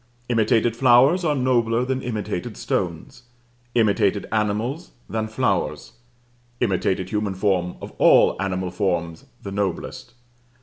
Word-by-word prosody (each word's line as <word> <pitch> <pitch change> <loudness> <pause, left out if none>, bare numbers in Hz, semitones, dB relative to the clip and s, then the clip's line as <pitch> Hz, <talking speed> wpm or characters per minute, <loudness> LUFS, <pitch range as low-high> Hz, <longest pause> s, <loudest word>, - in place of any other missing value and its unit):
Imitated 115 0 +2
flowers 130 +8 +5
are 150 -3 +1
nobler 120 -2 +1
than 130 0 -2
imitated 105 -3 -4
stones, 85 +1 -3 0.5
imitated 105 -3 +2
animals, 110 - -2
than 110 0 -2
flowers; 110 +1 -1 0.7
imitated 95 -4 0
human 105 -2 -2
form 95 -2 0
of - - -7
all - - +5
animal 95 -2 -2
forms 85 -4 -2 0.2
the 100 - -6
noblest. 100 +4 -4
110 Hz, 115 wpm, -23 LUFS, 95-120 Hz, 0.7 s, flowers